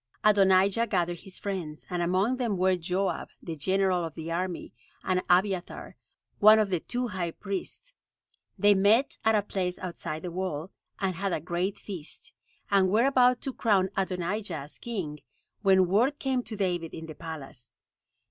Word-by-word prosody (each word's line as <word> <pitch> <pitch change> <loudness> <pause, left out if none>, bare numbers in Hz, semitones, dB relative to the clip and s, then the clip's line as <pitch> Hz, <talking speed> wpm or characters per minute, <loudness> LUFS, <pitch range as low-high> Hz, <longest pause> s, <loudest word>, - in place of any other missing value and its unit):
Adonijah 200 +2 +4
gathered 175 -4 0
his 190 -2 -9
friends; 175 -7 -5
and 180 -1 -2
among 190 +8 +1
them 235 -6 -1
were 185 +1 +3
Joab, 180 +1 -2
the 165 - -6
general 185 +3 +1
of 165 -2 -5
the 160 +1 -6
army, 180 +1 -3 0.3
and 185 -1 +1
Abiathar, 185 0 +1 0.4
one 215 +1 +8
of 210 -3 +1
the 180 - +1
two 245 +7 -3
high 185 -4 -2
priests. 200 - -6 0.6
They 205 0 +5
met 205 +7 +3
at 220 0 +4
a 205 - +2
place 185 -3 -2
outside 170 -3 -5
the 180 - -4
wall, 180 -2 -3 0.3
and 195 -2 0
had 195 +1 -2
a - - 0
great 175 +4 -2
feast, 175 -7 -8 0.4
and 195 -2 +4
were 220 +6 +3
about 250 -2 +4
to 270 - -4
crown 195 -6 +2
Adonijah 190 0 -2
as 145 0 -8
king, 180 -11 -4 0.4
when 190 -2 +5
word 235 +11 +2
came 265 -3 0
to 220 - -6
David 175 -4 -1
in 160 - -7
the 160 - -8
palace. 140 -6 -9
190 Hz, 165 wpm, -28 LUFS, 175-205 Hz, 0.6 s, one